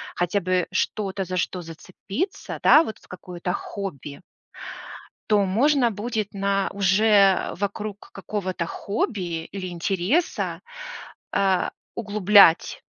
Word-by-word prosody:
хотя 175 +3 0
бы 185 0 0
что-то, 195 0 -1
за 185 +1 -3
что 180 +1 -2
зацепиться, 195 - -6
да, 310 - +7
вот, 220 - -6
в - - -22
какое-то 180 0 -5
хобби 150 - -6 1.1
то 205 -2 +4
можно 245 +5 +3
будет 215 0 -3
на 195 0 0
уже, 200 +2 +3 0.3
а, - - -4
вокруг 205 +1 -5
какого-то 190 -3 -3
хобби 180 -3 -3
или 190 -1 -6
интереса, 190 - -1 0.7
а, 190 -2 +1 0.2
углублять, 205 -5 +4
195 Hz, 110 wpm, -24 LUFS, 180-210 Hz, 1.1 s, да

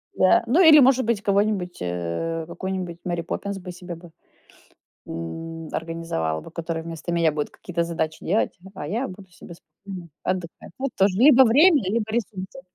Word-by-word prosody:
Да, 185 +4 +4
ну, 265 +10 +2
или, 315 -3 +9
может 260 -2 +5
быть, 225 -3 0
кого-нибудь, 200 -3 +1
э, 90 - -3
какую-нибудь 180 -1 -5
Мэри 175 -1 -2
Поппинс 200 +4 -4
бы 180 -1 -8
себе 175 -1 -8
бы, 170 0 -14 1.0
м, 165 - -6
организовала 160 - -3
бы. - - -12
Которая 165 -1 -4
вместо 165 +1 -6
меня 165 -2 +3
будет 150 -1 -3
какие-то 170 -1 -3
задачи 160 -2 -3
делать, 200 0 0 0.2
а 145 - -6
я 230 - -1
буду 190 0 -11
себе 175 0 -12
спокойно 175 +2 -11 0.2
отдыхать. 180 -3 -4
Тут 270 0 -2
тоже- 195 -1 +3
либо 265 0 +8
время, 295 - +5
либо 220 +1 0
ресурсы. 195 -5 -4
180 Hz, 165 wpm, -24 LUFS, 165-205 Hz, 1.0 s, или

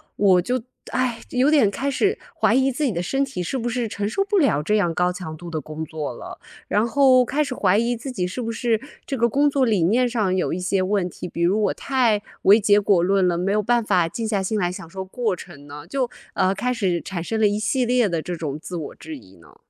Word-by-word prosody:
我 190 -3 +4
就， 250 +6 -1 0.3
唉， 255 -2 -1
有 260 +3 +2
点 280 -10 +4
开 275 +7 -2
始 400 - +1 0.2
怀 - - +3
疑 265 +1 +3
自 295 +5 -3
己 265 - +2
的 170 -3 -2
身 270 +10 0
体 265 -9 -5
是 180 +10 -2
不 240 -1 -3
是 240 -1 -1
承 205 -1 -3
受 390 - 0
不 405 0 +1
了 275 - +3
这 210 +8 0
样 175 -6 +1
高 180 +1 +1
强 170 -4 -7
度 175 +1 -9
的 160 -1 -3
工 155 +1 -6
作 155 -4 -5
了？ - - -10 0.3
然 210 +2 +2
后 260 -1 +5
开 295 +5 0
始 265 -3 -5
怀 195 0 +2
疑 235 +2 +1
自 255 +3 -6
己， 180 -7 -2
是 215 +8 -5
不 230 -1 -3
是 230 -1 0 0.3
这 270 - -3
个 235 +1 +3
工 285 +5 +3
作 270 -2 +2
理 210 -6 +2
念 240 +8 +3
上 215 -6 0
有 185 - 0
一 180 - -2
些 185 +1 0
问 185 -1 0
题？ 180 - -8
比 170 - -6
如 190 +5 +2
我 200 - +1
太 240 -6 +1 0.2
为 205 +3 +7
结 205 0 +4
果 195 -3 +3
论 190 +1 +2
了， 175 -1 +1
没 185 +3 0
有 210 +1 +2
办 240 +2 +2
法 185 -5 +2
静 225 +7 -4
下 200 -3 0
心 210 +2 -1
来 175 -1 0
享 175 -2 -8
受 190 +2 -6
过 215 -1 -2
程 145 -3 -12
呢， 145 +1 -10
就， 260 -3 -1 0.3
呃， 190 +1 +2
开 250 +6 -1
始 185 -7 0
产 170 +1 -5
生 220 +4 -2
了 215 - +5
一 205 - 0
系 240 +4 0
列 245 -2 +3
的 165 -2 -1
这 175 +2 -5
种 150 -2 -4
自 180 - -7
我 160 -4 -6
质 315 -2 -9
疑 - - -17
呢。 - - -19
210 Hz, 285 characters per minute, -22 LUFS, 180-250 Hz, 0.3 s, 为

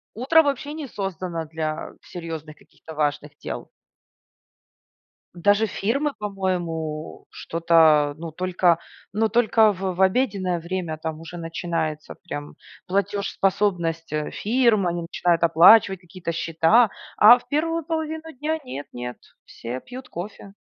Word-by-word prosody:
Утро 285 +8 +4
вообще 290 +1 -2
не 305 -2 -6
создано 185 -6 -4
для 155 0 -4
серьезных, 160 -3 -7
каких-то 160 - -14
важных 145 -1 -2
дел. - - -6 1.7
Даже 205 +5 +3
фирмы, 275 +10 -1
по-моему, 175 -6 -3
что-то, 160 -3 +3
ну 165 0 -7
только 180 0 +2 0.3
ну 220 +1 +1
только 220 -1 +4
в 190 0 -3
в 190 - -2
обеденное 190 -4 +1
время 170 -2 -4
там 155 0 -5
уже 165 +2 -9
начинается 165 -2 -3
прям 145 -4 -7 0.3
платежеспособность, 195 -3 0
э, 150 0 -2
фирм. 220 -4 +2
Они 170 0 -2
начинают 170 0 0
оплачивать 185 +4 +6
какие-то 175 -1 -6
счета, 165 +8 +3 0.3
а 235 +4 +9
в - - -17
1 330 +3 0
половину 320 0 -3
дня 300 +4 -2
нет 200 - -7
нет, 125 0 -6 0.3
все 120 +2 -6
пьют 255 +1 -10
кофе. 195 +2 -8
180 Hz, 125 wpm, -23 LUFS, 160-220 Hz, 1.7 s, а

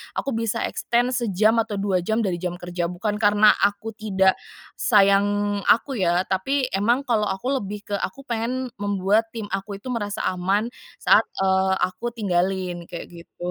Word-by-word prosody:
aku 275 - -2
bisa 230 0 -1
extend 240 +1 0
sejam 220 -3 +2
atau 225 -2 -1
2 195 -2 0
jam 220 +6 0
dari 180 -4 -1
jam 175 0 -3
kerja, 175 -1 -3
bukan 205 +4 -3
karena 210 0 +6
aku, 205 +3 0
tidak 190 -3 +1 0.4
sayang 205 -1 +3
aku, 255 +1 +3
ya. 175 -1 +2
Tapi 255 +8 0
emang, 235 +7 +2
kalau 225 -5 +1
aku, 220 +8 -2
lebih, 205 0 -7
ke - - +1
aku 275 +10 -5
pengen, 240 +3 -2
membuat 205 +2 0
tim 225 -3 -6
aku 195 +1 -5
itu, 215 - -11
merasa 210 -5 -2
aman 190 +4 0 0.3
saat, - - +5 0.2
eee, 190 0 +2
aku 230 +6 -2
tinggalin, 185 -4 -1
kayak 170 - -6 0.2
gitu. 175 - -9
205 Hz, 165 wpm, -23 LUFS, 190-225 Hz, 0.4 s, karena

